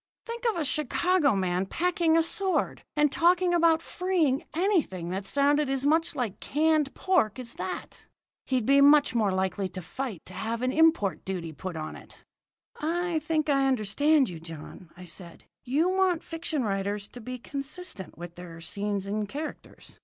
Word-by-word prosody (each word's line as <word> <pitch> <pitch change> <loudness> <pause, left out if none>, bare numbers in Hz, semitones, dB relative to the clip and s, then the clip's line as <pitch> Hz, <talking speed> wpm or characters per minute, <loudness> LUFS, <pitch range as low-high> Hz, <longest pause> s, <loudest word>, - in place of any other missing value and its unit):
"Think 470 +1 -6
of 445 - -1
a 325 -3 -1
Chicago 305 - +2
man 185 0 0
packing 335 - +2
a 330 - +4
sword, 380 +2 0
and 295 -1 +3
talking 350 +3 +3
about 330 -1 +4
freeing 340 -7 0
anything 325 - 0
that 190 +2 -3
sounded 285 +2 +2
as 270 0 0
much 320 +2 +2
like 240 -8 -3
canned 305 -1 +1
pork 315 - +1
as 250 -2 -4
that! - - -6 0.4
He'd 255 -4 0
be 275 +2 +5
much 290 0 +6
more 215 -4 +2
likely 190 +1 -1
to 185 - -7
fight 210 +1 -5
to 185 - -11
have 225 +5 -3
an 255 - +1
import 315 - +3
duty 175 -4 -4
put 185 +2 -6
on 155 -1 -5
it." - - -13 0.6
"I 340 +1 0
think 310 0 -1
I 275 -2 +3
understand 265 +5 +3
you, 170 -4 -7
John," 165 +1 -10 0.2
said 175 -1 -9
I. - - -34 0.2
"You 295 +8 +2
want 370 -3 +2
fiction 325 -4 -2
writers 200 0 -2
to 245 - -10
be 255 +3 -6
consistent 275 - -6
with 175 0 -8
their 175 -2 -10
scenes 200 +3 -2
and 205 +1 -2
characters. 300 +5 -8
270 Hz, 170 wpm, -28 LUFS, 195-320 Hz, 0.6 s, much